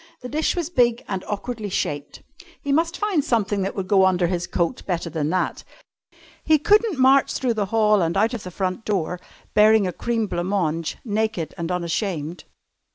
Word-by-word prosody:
The 250 - -7
dish 310 +3 0
was 345 -2 -3
big 240 -6 +2
and 190 -2 -3
awkwardly 215 +1 -4
shaped. 145 -5 -3 0.4
He 280 - -3
must 330 +4 +1
find 405 -8 +1
something 205 -5 0
that 195 +1 -2
would 190 -2 -3
go 195 -1 +4
under 180 -1 +2
his 175 0 -1
coat 170 -2 -1
better 170 -2 -2
than 150 -1 -1
that. 185 +2 -1 0.8
He 315 -1 +4
couldn't 415 +3 +3
march 265 +1 +4
through 250 -3 0
the 210 -3 -1
hall 215 -1 +3
and 170 +2 0
out 220 +4 +2
of 235 - -4
the 185 - -7
front 185 +2 -3
door, 180 -4 -1 0.3
bearing 215 -1 +5
a 180 - -2
cream 230 +2 -1
blanc 175 -3 -3
mange, 165 -5 -1
naked 215 -6 -1
and 170 +1 -4
unashamed. 170 -2 -3
205 Hz, 185 wpm, -23 LUFS, 180-240 Hz, 0.8 s, bearing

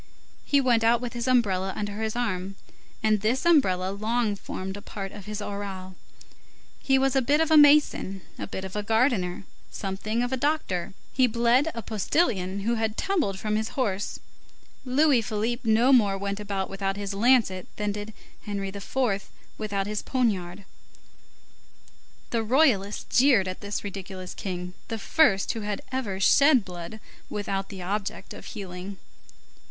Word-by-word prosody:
He 285 - +3
went 245 -4 +3
out 230 +1 +4
with 245 0 -5
his 240 +1 -3
umbrella 195 -7 +2
under 205 +1 -4
his 220 0 -2
arm, 195 -5 -2 0.5
and 215 -2 +3
this 240 +8 0
umbrella 190 - +3
long 215 +1 0
formed 190 -1 -6
a 205 - -8
part 195 -1 -6
of 205 -2 -11
his 210 0 -4
aureole. 195 -2 -6 0.9
He 270 -1 +3
was 270 0 +2
a 270 - +4
bit 285 +4 +2
of 320 0 +1
a - - +7
mason, 290 - +5 0.2
a - - -4
bit 190 0 -5
of 190 - -8
a 210 - 0
gardener, 220 -5 +1 0.3
something 210 +4 -3
of 245 +1 -2
a - - +1
doctor; 250 - -1 0.2
he 255 -1 +4
bled 240 +5 +3
a 230 - -4
postilion 200 - 0
who 230 +4 0
had 220 -1 -1
tumbled 325 - 0
from 215 +2 -2
his 220 +4 -3
horse; 205 -6 -1 0.7
Louis 265 0 +4
Philippe 225 +2 -2
no 240 +5 +5
more 205 -6 +4
went 200 +1 -3
about 200 -2 -3
without 195 0 -3
his 200 -1 -4
lancet, 210 -4 +3
than 210 0 -1
did 205 +1 -6 0.4
Henri 200 -1 -3
IV. 200 +1 -2 0.3
without 200 -2 -2
his 210 +1 -2
poniard. 200 -7 -1 1.7
The 230 - +1
Royalists 220 -5 +2
jeered 250 -7 +5
at 185 - -5
this 205 -1 -4
ridiculous 190 -2 -7
king, 180 -2 -5
the 225 - -3
first 215 -3 +3
who 225 - -5
had 205 -1 -3
ever 225 -8 -2
shed 270 +3 +5
blood 180 +4 -8 0.3
with 205 -1 -4 0.2
the 190 -3 -7
object 200 +1 -4
of - - -11
healing. 190 -2 -7
210 Hz, 160 wpm, -26 LUFS, 195-245 Hz, 1.7 s, a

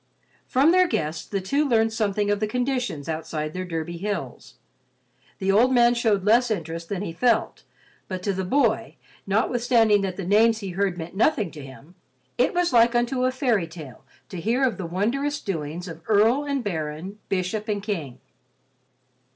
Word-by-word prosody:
From 275 +6 +4
their 365 0 +5
guests, 155 - -2
the 200 - -2
two 280 +11 +1
learned 225 -5 +2
something 205 -2 0
of 205 - 0
the 215 - 0
conditions 245 - -2
outside 155 -1 -4
their 185 - -3
Derby 170 0 -4
hills. 185 -9 -5 0.8
The 195 -1 0
old 235 +6 +4
man 240 -1 +5
showed 220 -5 +1
less 235 +4 +4
interest 165 -4 -4
than 200 -1 -3
he 165 - -5
felt, 230 +5 +1 0.5
but 185 -1 -5
to 200 - 0
the 190 0 -2
boy, 225 +1 +1 0.3
notwithstanding 225 0 +3
that 190 -2 -3
the 195 - -4
names 220 +4 +4
he 200 -3 -6
heard 190 0 -1
meant 170 +1 -7
nothing 215 - +1
to 150 -3 -10
him, 135 +5 -13 0.5
it - - +2
was 350 -5 +1
like 235 0 +5
unto 250 +2 +1
a 255 - +2
fairy 245 - 0
tale 155 -8 -11 0.3
to 180 - -6
hear 235 +8 +1
of 255 -3 +1
the 180 - -4
wondrous 260 - -1
doings 170 -1 -4
of 165 -2 -9
earl 225 +7 +3
and 280 -3 -2
baron, 165 +1 -4
bishop 195 +3 -2
and 205 -1 -2
king. 165 - -4
205 Hz, 175 wpm, -24 LUFS, 175-240 Hz, 0.8 s, their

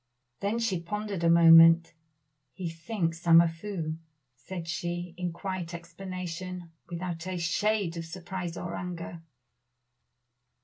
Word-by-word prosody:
Then 205 +3 -1
she 230 -6 0
pondered 200 +1 -4
a 170 - +4
moment. 165 0 +8 0.6
"He 175 -2 -4
thinks 170 -1 -3
I - - +3
am 165 0 +10
a 170 - +5
fool," 165 -2 -4 0.4
said 165 +7 -7
she, 175 +1 -3
in 180 -1 -3
quiet 175 -1 -5
explanation, 180 0 -6 0.2
without 175 0 -4
a 185 -1 -3
shade 180 +2 0
of 165 - -4
surprise 175 0 -6
or 170 -1 -5
anger. 170 -2 -6
175 Hz, 130 wpm, -29 LUFS, 165-185 Hz, 0.6 s, am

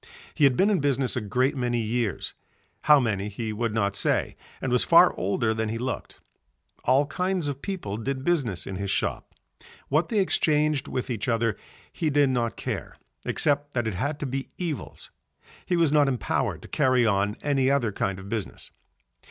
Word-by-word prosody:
He 145 - +3
had 130 -3 +3
been 200 +3 +4
in 195 - +2
business 135 -2 +1
a 125 - -1
great 125 +7 +1
many 120 -2 0
years, 115 -3 -2 0.5
how 150 -1 +7
many 105 -5 -1
he 110 +1 -4
would 115 +1 -1
not 100 -2 0
say, - - 0 0.2
and - - -3
was - - +4
far - - +6
older 110 +4 0
than 110 0 -2
he 115 - -2
looked. 125 +2 -5 0.7
All 135 +3 +4
kinds 180 +2 -1
of 140 -1 -4
people 175 - -4
did 130 +3 -3
business 135 - 0
in 95 - -5
his 100 0 -3
shop. - - -2 0.5
What 155 +5 +2
they 220 - -1
exchanged 155 -6 +2
with 130 0 -3
each 110 -4 -3
other 115 -2 +1 0.4
he 160 - -1
did 145 -2 +3
not 120 -2 -1
care - - -4 0.3
except 145 -1 +1
that 120 -2 0
it 110 - -1
had 145 +11 -2
to - - -1
be 135 +1 -4
evils, 165 -6 -5 0.6
he 175 - +1
was 165 -4 +3
not 150 -2 +4
empowered 120 - -1
to - - -10
carry 130 -5 +2
on 100 -1 +1
any 135 -3 +2
other 135 -6 +2
kind 100 -1 -2
of 95 +1 -10
business. 110 -2 -5
130 Hz, 185 wpm, -26 LUFS, 110-145 Hz, 0.7 s, how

